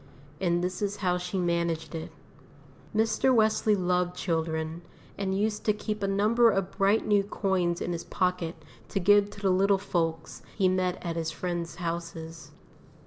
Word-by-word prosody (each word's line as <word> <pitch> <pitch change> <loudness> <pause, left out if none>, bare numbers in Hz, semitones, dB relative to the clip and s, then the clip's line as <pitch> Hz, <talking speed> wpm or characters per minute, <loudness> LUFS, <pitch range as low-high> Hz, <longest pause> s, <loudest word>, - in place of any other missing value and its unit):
And 175 -2 +1
this 180 +1 -3
is 205 0 -1
how 180 0 +2
she 180 +2 -4
managed 170 -2 -1
it. 160 -1 -5 0.8
Mr. 220 +4 +3
Wesley 220 -2 +3
loved 180 -1 0
children, 160 -1 -2 0.3
and 195 -1 -1
used 210 +1 -1
to 210 - +4
keep 210 0 -4
a 195 - 0
number 215 +4 +4
of 195 -3 0
bright 200 +2 +2
new 205 -1 +4
coins 190 -4 0
in - - -2
his 170 - -5
pocket 180 -3 -1 0.3
to 195 - -1
give 205 +2 +5
to 205 - -11
the 195 -2 +2
little 195 +2 +4
folks 165 -4 -2 0.2
he 195 -3 +4
met 185 0 +1
at 170 -1 -2
his 165 -1 -1
friends' 170 +1 -4
houses. 165 -3 -5
185 Hz, 165 wpm, -28 LUFS, 170-200 Hz, 0.8 s, give